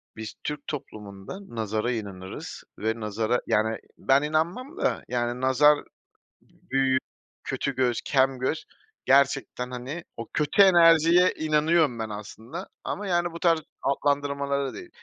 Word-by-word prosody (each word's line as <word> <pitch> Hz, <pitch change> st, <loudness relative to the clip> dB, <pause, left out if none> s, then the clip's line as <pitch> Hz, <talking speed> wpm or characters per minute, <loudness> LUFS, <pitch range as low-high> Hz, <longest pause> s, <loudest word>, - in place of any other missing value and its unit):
biz 110 Hz, -1 st, -7 dB
Türk 150 Hz, -1 st, -5 dB
toplumunda 105 Hz, -, -7 dB, 0.2 s
nazara 110 Hz, +2 st, -1 dB
inanırız 100 Hz, -5 st, -6 dB, 0.2 s
ve 110 Hz, +2 st, -1 dB
nazara, 110 Hz, +3 st, -1 dB
yani, 110 Hz, +1 st, +1 dB, 0.2 s
ben 135 Hz, +1 st, +3 dB
inanmam 170 Hz, -, -1 dB
da. -, -, 0 dB
Yani 120 Hz, 0 st, -2 dB
nazar, 135 Hz, +3 st, +5 dB
ııı, -, -, -10 dB, 0.6 s
büyü, 135 Hz, 0 st, -1 dB, 0.5 s
kötü 140 Hz, -, -2 dB
göz, 125 Hz, -2 st, +1 dB
kem 135 Hz, -1 st, +2 dB
göz... 130 Hz, +5 st, -2 dB, 0.4 s
Gerçekten, 135 Hz, -2 st, +2 dB
hani, 130 Hz, +7 st, -6 dB
o 115 Hz, -, -6 dB
kötü 150 Hz, +7 st, +3 dB
enerjiye 170 Hz, -1 st, +6 dB
inanıyorum 155 Hz, -4 st, +2 dB
ben 110 Hz, -1 st, -3 dB
aslında 110 Hz, -, -8 dB
ama 205 Hz, 0 st, -4 dB
yani 175 Hz, -1 st, +1 dB
bu 170 Hz, -, -8 dB
tarz 165 Hz, -2 st, +3 dB, 0.2 s
adlandırmalara 140 Hz, 0 st, 0 dB
değil. 355 Hz, 0 st, -9 dB
135 Hz, 130 wpm, -26 LUFS, 115-160 Hz, 0.6 s, enerjiye